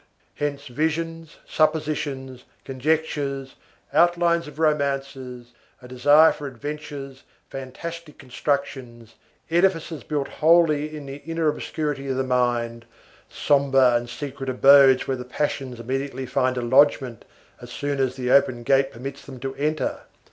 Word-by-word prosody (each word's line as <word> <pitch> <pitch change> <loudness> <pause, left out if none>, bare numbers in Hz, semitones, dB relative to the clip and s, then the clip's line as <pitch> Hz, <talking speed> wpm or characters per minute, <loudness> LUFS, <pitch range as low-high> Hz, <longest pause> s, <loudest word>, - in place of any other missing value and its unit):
Hence 145 -1 -3
visions, 160 +4 -3
suppositions, 145 -5 -1 0.2
conjectures, 140 -1 -2 0.4
outlines 170 -1 +3
of 150 -1 -12
romances, 135 -5 -2 0.3
a 125 - -13
desire 145 +5 +5
for 145 - -6
adventures, 140 0 -7 0.3
fantastic 150 +5 -8
constructions, 125 -3 -4 0.4
edifices 170 -2 +1
built 145 -3 -2
wholly 155 -2 +2
in 145 - -9
the 135 0 -7
inner 165 +2 -1
obscurity 150 -2 -3
of 130 -1 -2
the 130 - +1
mind, 120 -2 -1 0.4
sombre 135 -3 +3
and 120 0 -1
secret 135 +1 -6
abodes 135 0 +6
where 135 - -1
the 125 - -6
passions 130 -1 -3
immediately 135 +2 -3
find 130 -1 0
a 125 - -2
lodgement 130 -1 +3 0.4
as 120 - -10
soon 140 +2 -3
as 130 -1 0
the 125 -1 -2
open 125 -3 +3
gate 135 +2 +2
permits 135 +4 -8
them 130 -2 -11
to 135 0 -4
enter. 150 0 -2
140 Hz, 130 wpm, -23 LUFS, 130-150 Hz, 0.4 s, abodes